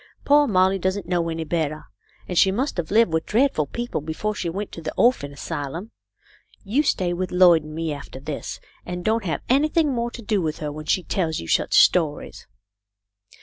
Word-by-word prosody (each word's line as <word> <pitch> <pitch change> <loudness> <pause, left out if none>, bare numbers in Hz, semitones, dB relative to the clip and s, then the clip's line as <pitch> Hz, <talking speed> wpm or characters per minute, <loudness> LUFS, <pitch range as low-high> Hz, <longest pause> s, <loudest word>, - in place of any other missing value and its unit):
" - - -33
Poor 290 0 +5
Molly 190 -1 +3
doesn't 190 +1 -1
know 170 -1 0
any 165 0 -3
better, 155 -1 -2 0.4
and 180 - -4
she 190 +2 +5
must 255 +6 -2
have 170 -3 -3
lived 215 -4 +3
with 160 0 0
dreadful 225 - +2
people 240 - -4
before 160 +8 -3
she 180 -4 -3
went 195 +4 -5
to 165 - -8
the 160 - -4
orphan 235 - +2
asylum. 160 - -5 0.7
You 225 +9 +1
stay 185 -11 0
with 180 +1 -3
Lloyd 180 -3 +5
and 155 0 -9
me, 165 -1 -2
after 140 -2 -9
this, 140 +1 -6 0.2
and 180 0 -6
don't 220 -1 +1
have 165 - -2
anything 300 +2 +2
more 235 -1 -1
to 235 0 -10
do 210 -2 0
with 155 -2 -2
her 150 -1 -4
when 155 +1 -8
she 180 +4 +1
tells 165 -4 -1
you 85 - -7
such - - +1
stories." 160 -5 +2
180 Hz, 200 wpm, -23 LUFS, 160-215 Hz, 0.7 s, Poor